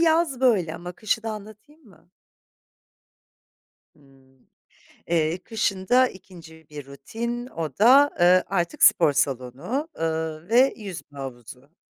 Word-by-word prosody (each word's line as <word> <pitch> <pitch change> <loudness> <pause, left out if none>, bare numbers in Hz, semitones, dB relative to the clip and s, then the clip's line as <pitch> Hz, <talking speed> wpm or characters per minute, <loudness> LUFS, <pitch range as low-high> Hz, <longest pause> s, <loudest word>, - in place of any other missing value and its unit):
yaz 320 -5 +2
böyle 200 -11 +2
ama 175 +1 -8
kışı 215 +4 -2
da 225 - -4
anlatayım 215 +9 -12
mı? 175 -3 -22 1.9
Hımm, 135 -2 -25 0.6
eee, 165 +1 0
kışın 200 -4 -2
da 255 +1 +4
2'nci 165 -5 -15
bir 145 -2 -9
rutin 235 - -6
o 160 - -6
da, 270 +6 +6
ııı, 180 +1 +5
artık 175 -3 -2
spor 145 - +5
salonu, 140 - -2
ııı, 160 0 -3
ve 255 +4 +4
yüzme 185 -9 -10
havuzu. 130 +3 -10
175 Hz, 120 wpm, -24 LUFS, 150-230 Hz, 1.9 s, da